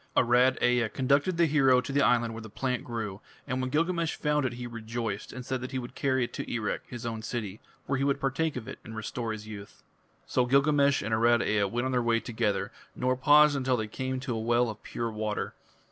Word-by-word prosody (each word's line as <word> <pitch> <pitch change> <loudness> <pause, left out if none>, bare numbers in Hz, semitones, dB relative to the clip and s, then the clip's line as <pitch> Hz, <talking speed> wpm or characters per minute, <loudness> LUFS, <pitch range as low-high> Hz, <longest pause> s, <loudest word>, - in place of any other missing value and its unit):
Arad 125 +2 +4
Ea 120 -2 +3
conducted 140 +8 +1
the 170 - +5
hero 135 -4 +4
to 125 - -4
the 140 +1 +2
island 120 -3 +3
where 115 - -7
the 110 - -9
plant 125 +3 -2
grew, 105 -5 -5 0.2
and 130 +1 -2
when 130 - -2
Gilgamesh 165 +3 0
found 150 -3 +1
it 125 - -5
he 120 0 -6
rejoiced, 115 -2 -4
and 125 0 -8
said 130 -1 -2
that 130 - -5
he 130 - -3
would 120 -1 -6
carry 130 -2 +1
it 120 - -4
to - - -5
Erech, 110 -3 -2
his 120 -1 -7
own 115 -1 -3
city, 110 -3 -4 0.3
where 135 -1 -1
he - - +1
would 140 0 +1
partake 140 +4 0
of 125 -3 -6
it - - -8
and 110 - -9
restore 110 +2 -4
his 110 -1 -6
youth. 105 -2 -10 0.4
So 125 -1 +1
Gilgamesh 140 0 +3
and 110 +2 -2
Arad 115 +1 +4
Ea 105 -1 +2
went 120 +6 -2
on 130 - -1
their 125 -1 +2
way 115 -1 +2
together, 110 -4 -1 0.2
nor 130 0 +1
paused 145 +2 +6
until 130 -2 +1
they 110 - -2
came 130 +4 -3
to 130 -2 -3
a - - -2
well 120 +1 +2
of 105 - -12
pure 115 -1 -4
water. 110 -1 -3
125 Hz, 235 wpm, -29 LUFS, 115-135 Hz, 0.4 s, paused